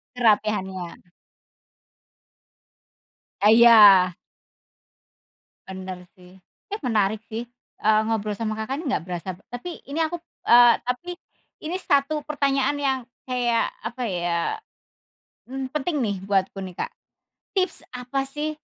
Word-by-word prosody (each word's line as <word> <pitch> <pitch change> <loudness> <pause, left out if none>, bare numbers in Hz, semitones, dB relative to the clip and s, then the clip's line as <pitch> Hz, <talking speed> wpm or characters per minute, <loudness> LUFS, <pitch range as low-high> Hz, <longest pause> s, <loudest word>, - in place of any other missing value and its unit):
Kerapihannya. 205 -6 0 2.4
Ah 210 - +5
iya. 210 -6 +8 1.5
Bener 185 -1 -8
sih 180 +1 -18 0.3
ya 415 +1 -5
menarik 215 -4 +1
sih, 230 +2 -3 0.4
eee, 215 0 +4
ngobrol 215 -2 -1
sama 220 0 -3
Kakak 240 +5 -3
nih 330 - -7
nggak 165 - -1
berasa. 180 +1 -5 0.2
Tapi 330 +8 -7
ini 290 +4 -4
aku, 345 +2 -3 0.3
eee, 240 0 +8
tapi, 250 +9 -3 0.5
ini 320 +3 -3
1 290 -1 +1
pertanyaan 280 -2 +1
yang 275 -2 0 0.2
kayak 245 -2 0
apa 245 +2 -4
ya, 175 -2 -1 1.1
mmm, 265 +1 -5
penting 300 -1 -1
nih 205 -4 -1
buatku 195 0 0
nih 185 - -8
Kak, - - -3 0.7
tips 375 -1 0
apa 250 +2 -3
sih 300 +3 -4
235 Hz, 115 wpm, -24 LUFS, 195-275 Hz, 2.4 s, iya